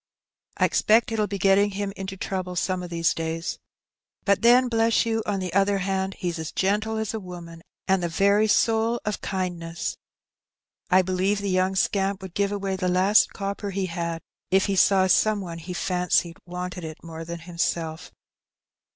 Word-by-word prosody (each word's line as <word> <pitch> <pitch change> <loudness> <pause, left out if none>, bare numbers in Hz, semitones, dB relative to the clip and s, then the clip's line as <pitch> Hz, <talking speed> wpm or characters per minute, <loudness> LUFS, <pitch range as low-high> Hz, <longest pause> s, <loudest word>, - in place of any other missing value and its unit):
I - - +4
expect 225 +2 +3
it'll 215 -2 0
be 200 - -4
getting 195 +2 +4
him 200 0 -4
into 195 0 -6
trouble 185 -1 -4
some 185 +1 -1
of 180 - -7
these 165 -1 +1
days. 165 +1 -3 0.7
But 200 -1 +3
then, 245 +2 +6
bless 230 -1 +2
you, 225 -1 0
on 200 -2 0
the 180 -2 -4
other 200 +1 +3
hand, 190 0 -2
he's 175 -2 -3
as 160 - -5
gentle 210 +3 0
as 220 -1 -2
a 220 - -3
woman, 175 -3 -10 0.3
and 190 -1 +3
the 175 - -1
very 200 +5 +3
soul 225 +2 +2
of 210 -1 -2
kindness. 175 -3 -3 0.9
I 185 0 +5
believe 185 +2 0
the 200 -1 -2
young 185 +1 +1
scamp 195 +1 0
would 190 -3 -8
give 200 +1 0
away 195 -2 -2
the 185 -1 -1
last 190 +4 +4
copper 200 +1 -4
he 195 0 -2
had, 170 -2 -4 0.3
if 190 +1 +3
he 200 - 0
saw 190 0 +4
some 210 +3 +3
one 170 -3 -6
he 170 +3 -8
fancied 180 -1 0
wanted 180 0 -5
it 155 -1 -8
more 165 -1 -7
than 170 +1 -6
himself." 170 -1 -3
190 Hz, 180 wpm, -25 LUFS, 175-200 Hz, 0.9 s, then